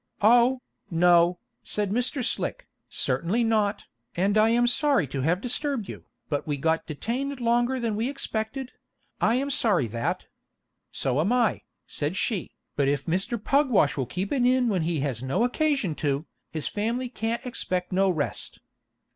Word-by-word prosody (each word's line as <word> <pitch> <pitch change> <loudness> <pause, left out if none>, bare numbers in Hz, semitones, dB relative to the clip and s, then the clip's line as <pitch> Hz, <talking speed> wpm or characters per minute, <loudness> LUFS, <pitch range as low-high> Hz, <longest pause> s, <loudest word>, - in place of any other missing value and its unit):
"Oh, 245 +3 +5 0.3
no," 175 0 +4 0.2
said 205 -2 -2
Mr. 250 +4 -1
Slick, - - -3 0.2
"certainly 210 +8 0
not, 215 -3 +1 0.3
and 195 +4 +1
I 215 +1 +5
am 240 +1 +3
sorry 275 - +3
to 135 0 -4
have 170 +7 +1
disturbed 255 -3 -2
you, - - -9 0.2
but 145 -1 -2
we 145 -1 -1
got 160 +3 0
detained 250 - -3
longer 240 +2 +1
than 230 -3 -1
we 225 +4 -1
expected; 255 -1 -3 0.5
I 225 +3 +3
am 275 +2 -1
sorry 220 - +3
that 115 +2 -2 0.4
" - - -55 0.3
"So 130 +1 0
am 190 +8 +1
I," 245 -3 +2 0.2
said 150 +6 -3
she, 205 -7 -1 0.3
"but 140 -1 +2
if 140 0 0
Mr. 190 +8 -1
Pugwash 235 - +2
will 130 -4 -2
keep 185 +8 -3
an 265 -4 +1
inn 250 -1 +3
when 190 -5 +1
he 160 -2 -1
has 135 -5 -2
no 130 - 0
occasion 275 - +1
to, 145 +1 0 0.2
his 155 -2 -3
family 230 +5 -1
can't 235 +1 -3
expect 185 -7 -2
no 190 +1 +3
rest." 155 -5 -3
215 Hz, 165 wpm, -26 LUFS, 165-245 Hz, 0.5 s, Oh